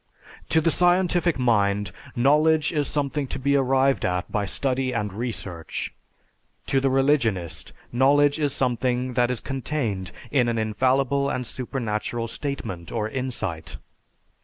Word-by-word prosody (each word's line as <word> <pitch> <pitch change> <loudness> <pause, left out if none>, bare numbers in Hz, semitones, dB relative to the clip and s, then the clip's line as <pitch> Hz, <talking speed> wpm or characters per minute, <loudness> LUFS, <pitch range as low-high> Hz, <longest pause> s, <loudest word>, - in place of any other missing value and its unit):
To 160 - +4
the 165 +1 +2
scientific 175 -1 +3
mind, 105 -5 +2 0.2
knowledge 150 +5 +3
is 150 -3 0
something 145 -1 -1
to - - -3
be 140 +1 +1
arrived 135 0 +2
at 90 -1 -1
by 105 -2 -1
study 130 +3 -1
and 105 -4 -2
research. 100 -7 -5 0.7
To 135 - +1
the 135 - +2
religionist, 130 - +1 0.2
knowledge 145 +4 +4
is 145 -2 +1
something 125 -1 0
that 120 0 +2
is 125 -2 -2
contained 130 -8 -3 0.2
in 130 -4 +3
an 115 - -1
infallible 130 +5 +1
and 125 0 -2
supernatural 115 -2 -3
statement 115 - -5
or 110 -2 -2
insight. 110 - -4
130 Hz, 135 wpm, -24 LUFS, 110-140 Hz, 0.7 s, To